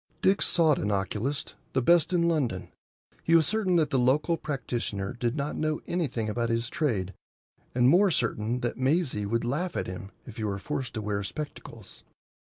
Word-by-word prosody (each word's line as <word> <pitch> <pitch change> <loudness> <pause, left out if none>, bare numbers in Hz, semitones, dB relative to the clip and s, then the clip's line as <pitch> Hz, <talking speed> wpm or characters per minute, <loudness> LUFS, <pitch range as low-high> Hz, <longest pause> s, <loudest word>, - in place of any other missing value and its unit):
Dick 195 +2 +4
sought 160 -5 +3
an 105 - -1
oculist,—the 120 - -2
best 170 +4 +4
in 175 -2 +2
London. 130 - -1 0.5
He 165 - +3
was 160 -2 +6
certain 205 -1 +1
that 160 -3 +2
the 135 - +2
local 145 +7 +3
practitioner 120 -9 -3
did 120 0 -1
not 145 0 -2
know 155 0 -1
anything 140 -11 -1
about 115 +2 -1
his 115 +1 -1
trade, 100 - -1 0.6
and 125 0 +4
more 185 +8 +6
certain 120 -4 0
that 120 +1 -2
Maisie 130 - +1
would 115 +2 0
laugh 155 +8 -1
at - - -1
him 95 +1 -7 0.2
if 120 - -11
he 110 - -3
were 100 -2 -1
forced 135 +4 -4
to 110 - -3
wear 105 -1 -1
spectacles. 150 +9 -8
130 Hz, 175 wpm, -28 LUFS, 110-155 Hz, 0.6 s, was